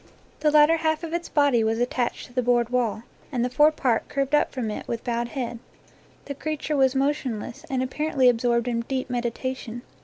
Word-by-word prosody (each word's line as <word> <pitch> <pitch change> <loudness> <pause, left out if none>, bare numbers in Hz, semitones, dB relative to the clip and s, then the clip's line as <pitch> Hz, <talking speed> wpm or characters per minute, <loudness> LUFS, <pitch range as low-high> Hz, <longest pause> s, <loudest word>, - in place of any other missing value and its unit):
The 305 0 +3
lat 295 0 +7
ter 330 +1 +3
half 315 0 0
of 330 0 -5
its 340 0 -3
body 285 -6 +3
was 220 +1 +1
attached 245 0 -1
to 245 - -17
the 250 - +1
board 240 -1 +2
wall, 235 -3 0 0.3
and 245 -3 0
the 250 - -3
fore 295 +4 +5
part 255 -7 0
curved 275 0 -1
up 295 - +3
from 235 -5 -3
it - - -6
with 230 - -4
bowed 235 -1 -1
head. 240 -2 -4 0.7
The 285 - -4
creature 305 +1 -3
was 265 -1 +3
motionless, 265 -5 -2
and 260 -1 0
apparently 270 0 +1
ab 240 -2 +4
sorbed 235 0 +1
in 235 -1 0
deep 260 +1 -3
meditation. 240 0 -3
255 Hz, 210 wpm, -25 LUFS, 235-290 Hz, 0.7 s, lat